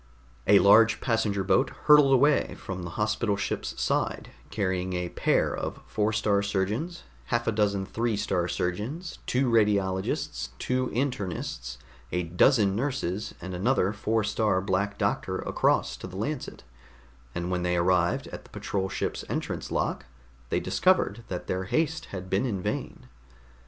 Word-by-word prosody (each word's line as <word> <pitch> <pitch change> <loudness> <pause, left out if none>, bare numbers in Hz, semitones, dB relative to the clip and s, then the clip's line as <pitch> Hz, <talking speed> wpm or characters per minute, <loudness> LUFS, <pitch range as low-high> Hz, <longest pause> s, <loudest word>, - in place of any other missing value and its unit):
A 100 - +8
large 110 +4 +6
passenger 110 -5 0
boat 100 +9 +3 0.2
hurtled 150 -2 +7
away 140 +3 +3
from 95 -1 -6
the 85 - -5
hospital 105 0 0
ship's 100 - -3
side, - - -1 0.2
carrying 95 -1 -1
a 90 -1 -2
pair - - +1
of - - -4
Four 105 0 0
star 105 -1 +2
surgeons, 105 - -2 0.2
half 120 -1 0
a - - +2
dozen 100 -2 +1
Three 115 +1 -1
star 95 -4 0
Surgeons, 110 - -3
two 130 +1 +2
Radiologists, 100 -4 +1
two 130 0 0
Internists, 100 - -3 0.3
a 90 0 0
dozen 100 - +3
nurses 110 -6 -2
and 95 +1 -6
another 100 +1 +1
Four 110 +1 0
star 105 -2 +1
Black 100 +2 -1
Doctor 100 -2 -1
across - - +1
to - - -7
the 90 0 -9
Lancet; 125 +6 -4 0.7
and 85 +1 -2
when 90 -1 0
they 90 0 +1
arrived 90 0 +2
at - - -8
the - - -18
patrol 95 -1 -3
ship's - - -3
entrance - - -3
lock, - - -1 0.4
they - - +1
discovered 120 - +2
that 90 - -5
their 95 0 -2
haste 160 - 0
had 95 -1 -7
been 95 +7 +1
in 100 -5 -2
vain. - - -4
100 Hz, 150 wpm, -27 LUFS, 95-115 Hz, 0.7 s, A